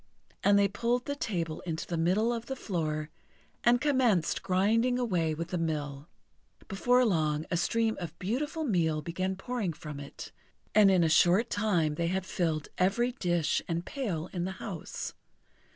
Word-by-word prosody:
And 200 0 +5
they 200 0 +5
pulled 235 +5 -1
the 285 - -2
table 170 - -2
into 165 -2 -4
the 175 - -3
middle 190 +8 +2
of 230 0 -5
the 265 - -3
floor, 155 -9 -3 0.5
and 240 0 +5
commenced 250 - +2
grinding 215 +6 +2
away 175 -10 0
with 165 +2 -5
the 180 - -2
mill. 150 -2 -3 0.6
Before 245 +6 +3
long 155 -6 +1
a 175 - +2
stream 225 +6 +1
of 170 -2 -6
beautiful 290 - -2
meal 165 - +1
began 185 +4 -2
pouring 205 -3 -3
from 150 -1 -8
it; 140 0 -9 0.4
and 210 -2 +7
in 185 -3 +4
a - - +4
short 175 +7 +4
time 180 -8 +1
they 170 +2 -1
had 190 +1 -1
filled 160 -5 -1
every 220 +7 +2
dish 175 - 0
and 170 +1 -2
pail 200 - -3
in 175 -2 -2
the 190 - -3
house. 190 -5 -6
185 Hz, 170 wpm, -30 LUFS, 165-230 Hz, 0.6 s, and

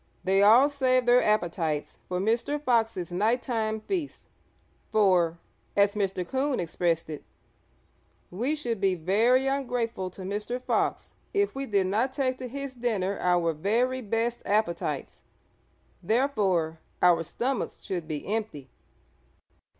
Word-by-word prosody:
They 195 +1 +3
all 230 +7 +7
saved 255 -3 +1
their 245 +1 +6
appetites 170 -7 -1
for 180 0 -2
Mr. 230 +8 0
Fox's 225 - 0
night 220 +7 +1
time 220 -3 -1
feast, 335 - -4 0.6
for, 180 -6 +3 0.4
as 200 0 +4
Mr. 190 -3 -2
Coon 265 +3 0
expressed 170 -1 -1
it, 155 -2 -7 1.1
"we 245 +12 -1
should 235 -8 -3
be 190 -2 +2
very 220 +10 +3
ungrateful 245 -8 -1
to 185 +1 -10
Mr. 210 +6 -3
Fox 255 - -1 0.2
if 405 0 +2
we 270 0 -4
did 200 -4 +2
not 225 +8 0
take 260 -2 -1
to 255 - -5
his 275 +1 -6
dinner 215 -6 -1
our 175 -2 +2
very 235 +10 0
best 230 +2 -1
appetites; 205 -4 -1 0.8
therefore 195 - +1 0.2
our 175 -2 +5
stomachs 245 - -3
should 175 -4 -4
be 150 -2 -4
empty." 210 -10 -4
215 Hz, 130 wpm, -27 LUFS, 185-255 Hz, 1.1 s, all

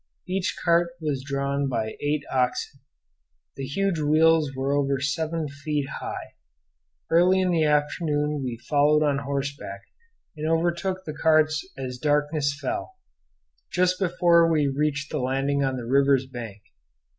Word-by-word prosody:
Each 190 +1 -1
cart 170 0 +3
was 145 -5 -2
drawn 140 0 -1
by 110 -3 -2
eight 145 0 0
oxen. 130 +2 -1 0.8
The 135 0 -5
huge 195 +4 0
wheels 155 0 +4
were 135 +1 -1
over 140 -1 +1
seven 155 +3 -1
feet 145 0 -3
high. - - -6 0.8
Early 180 +3 +5
in 185 -1 +1
the 160 -2 +2
afternoon 150 0 0
we 125 -2 -3
followed 150 +1 +4
on 145 -2 +1
horseback, 140 -7 -4 0.5
and 155 +1 -3
overtook 175 +3 0
the 155 - -5
carts 155 0 +3
as 125 -2 -5
darkness 145 0 +1
fell, 350 - -4 0.8
just 180 0 +2
before 170 -2 +4
we 150 -3 +2
reached 140 +1 -1
the 150 - -1
landing 135 +2 0
on 135 -1 -1
the 120 - -5
river's 135 +1 +3
bank. 115 -6 -8
150 Hz, 140 wpm, -25 LUFS, 140-165 Hz, 0.8 s, Early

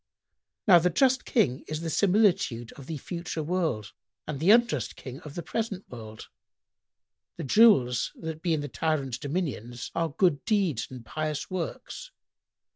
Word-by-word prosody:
[FN#103] - - -62
"Now 175 -2 +9
the 180 +2 +2
just 260 +8 +2
King 140 - +2
is 155 0 -4
the 165 -1 -3
similitude 185 - +2
of 140 -2 -12
the 160 - -4
future 170 +1 -5
world 155 - -1 0.3
and 150 -3 -4
the 165 +6 +2
unjust 220 - +4
King 130 0 -8
that 160 - -15
of 145 - -10
the 175 - -4
present 215 -4 -3
world; 110 -3 -9 1.1
the - - -4
jewels 135 - +4
that 160 -1 -6
be 170 -2 +1
in 150 - -2
the 145 - -4
tyrant's 140 -4 -1
dominions 135 - -4
are 165 -1 0
good 165 -1 +1
deeds 195 - +1
and 125 -3 -10
pious 155 +3 -3
works. 185 - -5
160 Hz, 165 wpm, -27 LUFS, 130-185 Hz, 1.1 s, Now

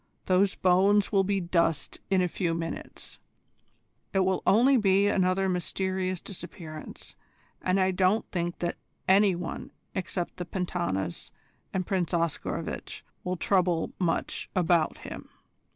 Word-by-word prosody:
Those 190 +1 +3
bones 195 +3 +4
will 195 -2 +4
be 195 +1 +1
dust 170 -3 0
in 190 -1 +3
a - - +2
few 170 -1 -1
minutes. 165 0 -6 0.9
It 195 - +3
will 185 0 +1
only 250 +6 +6
be 200 -4 +4
another 190 -1 +2
mysterious 185 +1 -1
disappearance, 170 -4 -9 0.5
and 185 +1 +2
I 190 0 +3
don't 190 +4 +2
think 175 -1 -2
that 175 0 -2 0.3
any 195 0 +5
one 175 -1 -5 0.2
except 180 -1 -3
the 180 - -4
Pentanas 95 - -2 0.4
and 185 -1 -1
Prince 180 -2 0
Oscarovitch 170 -2 -3 0.2
will 180 0 -2
trouble 180 -3 +2
much 170 -3 -1
about 175 -3 +2
him. - - -9
185 Hz, 130 wpm, -28 LUFS, 175-190 Hz, 0.9 s, only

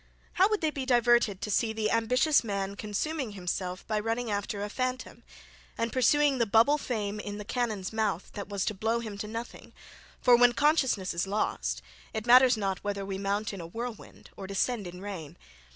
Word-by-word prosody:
How 380 +3 +4
would 425 -1 0
they 315 -1 +1
be 275 -3 -4
diverted 240 -5 +3
to 210 - -3
see 220 +2 +1
the 220 -1 -1
ambitious 250 +7 +3
man 200 -2 -3
consuming 220 +5 -3
himself 180 -1 -4
by 215 -1 -1
running 225 +1 -2
after 205 0 -2
a - - -2
phantom, 255 +3 -4 0.6
and, 230 -1 -1
pursuing 275 +2 +3
the 235 - +2
bubble 230 +8 +4
fame 215 -6 -3
in 205 -1 -5
"the 210 - -7
cannon's 220 -5 -2
mouth" 210 -5 -1
that 200 -1 -6
was 200 -2 -2
to - - -1
blow 225 +4 -1
him 215 -3 -6
to 210 - -4
nothing: 230 +2 -7 0.5
for 245 -1 +6
when 245 0 +5
consciousness 265 - +2
is 170 +3 -1
lost, 210 +2 -1 0.3
it 220 0 -3
matters 250 0 +7
not 195 -3 -2
whether 200 -1 -3
we 195 -1 -4
mount 200 +3 -1
in 195 - -6
a 165 - -7
whirlwind 230 +4 -8
or 195 - -7
descend 200 +1 -1
in 180 +1 -9
rain. 190 -7 -7
220 Hz, 195 wpm, -29 LUFS, 200-245 Hz, 0.6 s, matters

